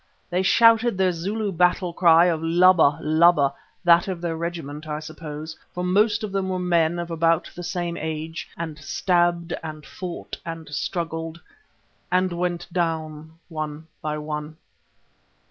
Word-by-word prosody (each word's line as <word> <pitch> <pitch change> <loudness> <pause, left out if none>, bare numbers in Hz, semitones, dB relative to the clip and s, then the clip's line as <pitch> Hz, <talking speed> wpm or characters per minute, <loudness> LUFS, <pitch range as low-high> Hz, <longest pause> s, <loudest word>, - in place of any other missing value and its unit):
They 180 +1 +1
shouted 230 +2 +5
their 190 -1 +3
Zulu 200 +5 -2
battle 180 0 +2
cry 170 -1 +6
of 165 -3 +1
Laba! 165 -3 +5
Laba! 155 -3 +4 0.3
that 175 +2 +5
of 185 -3 -3
their 170 -1 -2
regiment, 160 -3 -5
I 150 0 -3
suppose, 155 0 -7 0.2
for 180 - -2
most 210 +4 +2
of 210 - -3
them 195 -1 -1
were 185 - -1
men 175 -2 +2
of 170 0 -4
about 165 0 +1
the 175 - -8
same 175 -1 -3
age, 160 +1 -5
and 160 -2 -5
stabbed 175 +2 +1
and 155 -2 -8
fought 180 -2 -7
and 165 -1 -7
struggled 165 +1 -3 0.7
and 185 0 +2
went 175 0 -2
down 160 -2 -3
one 155 -1 -5 0.2
by 150 0 -2
one. 150 0 -5
170 Hz, 145 wpm, -24 LUFS, 160-180 Hz, 0.7 s, cry